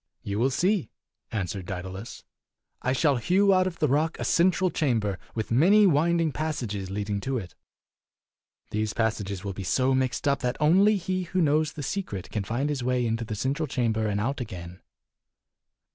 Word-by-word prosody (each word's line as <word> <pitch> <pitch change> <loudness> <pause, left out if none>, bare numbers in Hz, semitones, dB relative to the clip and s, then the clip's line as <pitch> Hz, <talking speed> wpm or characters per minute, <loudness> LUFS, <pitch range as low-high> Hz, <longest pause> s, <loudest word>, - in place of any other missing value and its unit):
"You 100 +1 -3
will 130 +3 +3
see," 180 - +1 0.4
answered 95 -3 -3
Daedalus. 95 +3 -6 0.6
"I 130 - 0
shall 140 +1 +2
hew 190 - +3
out 185 0 +3
of 175 -2 -5
the 150 - +2
rock 150 +4 +1
a - - -2
central 185 +1 +3
chamber, 115 - 0 0.2
with 110 -1 -3
many 190 - +6
winding 165 -1 +3
passages 120 -12 -3
leading 100 0 -2
to 130 +3 -1
it. 95 -7 -7 1.2
These 110 0 -1
passages 105 -4 -1
will 100 -1 -4
be 95 - -6
so 130 +7 +2
mixed 130 +2 0
up 140 -1 +2
that 125 -2 -2
only 190 +8 +5
he 185 0 -2
who 185 +2 -2
knows 155 -1 +2
the 150 - -6
secret 135 - -4
can 105 - -2
find 120 +8 -1
his 140 -4 -2
way 125 -1 +1
into 115 0 -1
the 110 -1 -4
cen 130 +6 0
tral 155 0 -3
chamber 110 -4 0
and 100 -1 -1
out 130 +5 -2
again." 90 -6 -8
130 Hz, 180 wpm, -26 LUFS, 105-160 Hz, 1.2 s, many